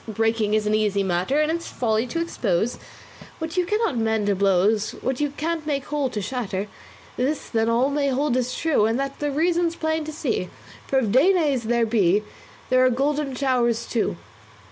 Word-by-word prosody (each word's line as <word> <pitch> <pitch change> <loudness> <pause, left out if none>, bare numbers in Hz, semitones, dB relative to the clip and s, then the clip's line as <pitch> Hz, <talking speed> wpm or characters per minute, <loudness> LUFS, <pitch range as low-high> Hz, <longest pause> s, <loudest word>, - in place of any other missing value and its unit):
Breaking 225 0 +1
is 215 -1 +1
an 210 - +1
easy 210 -2 +1
matter, 185 +10 0
And 305 +1 +1
it's 335 +1 -3
folly 225 0 0
to 330 - -3
expose 230 - -1 0.6
What 320 0 -5
you 360 -1 +1
cannot 425 - 0
mend 220 -1 0
to 200 -1 +2
blows; 200 +3 +2
What 260 -1 -1
you 290 - +1
can't 320 0 -2
make 280 -3 -1
whole 295 -3 -1
to 220 - -4
shatter. 205 -4 -3 0.5
This, 275 +4 -1
then, 225 -1 0
all 245 +4 +2
may 285 0 0
hold 275 0 +1
as 250 0 -1
true, 290 -10 +2
And 225 +3 0
the 275 +2 -2
reason's 335 +3 +1
plain 315 -1 -1
to 310 - -5
see; 270 - -2 0.4
For 270 - +1
if 230 -6 +1
Danaes 290 - +3
there 235 0 +2
be, 210 -3 +2 0.5
There 255 0 +5
are 255 - +5
golden 275 +2 -1
showers 240 -4 +1
too. 230 - -1
255 Hz, 190 wpm, -23 LUFS, 220-295 Hz, 0.6 s, There